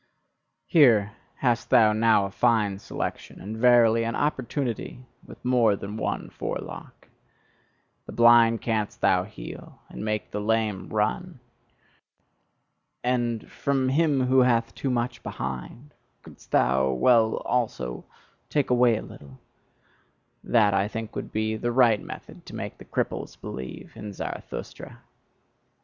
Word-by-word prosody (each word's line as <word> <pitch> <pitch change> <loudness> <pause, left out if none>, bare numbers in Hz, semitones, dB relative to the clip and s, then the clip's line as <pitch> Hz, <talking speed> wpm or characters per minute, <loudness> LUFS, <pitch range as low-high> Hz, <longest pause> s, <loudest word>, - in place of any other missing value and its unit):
Here 115 - +5 0.3
hast 120 -3 +1
thou 110 -2 +5
now 110 -2 +3
a 100 - -6
fine 105 -4 +1
selection, - - -6
and 105 +3 -6
verily, 115 -1 +5
an 115 0 -2
opportunity 130 -3 -3 0.2
with - - -14
more 120 -5 +3
than 100 +2 -7
one 110 - -3
forelock! - - -7 1.0
The - - -7
blind 120 -1 +5
canst 110 -3 -2
thou 90 -1 +3
heal, 95 - -10
and - - -7
make 105 -1 -3
the 105 - -3
lame 110 -2 -1
run; 125 +10 -2 1.6
and 120 -2 -1
from 135 -2 0
him 145 -1 +2
who 130 +1 +4
hath 115 -2 +2
too 135 - -3
much 120 0 -2
behind, 65 - -6 0.3
couldst - - -16
thou 65 +2 +2
well, 110 - +3
also, 65 - -2 0.5
take 145 -4 0
away 120 -2 +4
a - - -6
little; 70 -2 -13 1.1
that, 105 -4 +3
I 95 +1 +2
think, 110 0 -6
would - - -5
be 110 0 -1
the 120 +2 -2
right 120 -4 +4
method - - -10
to - - -9
make - - -6
the - - -12
cripples - - -3
believe 65 -1 -8
in 105 -2 -7
Zarathustra!" - - -7
115 Hz, 130 wpm, -26 LUFS, 105-125 Hz, 1.6 s, Here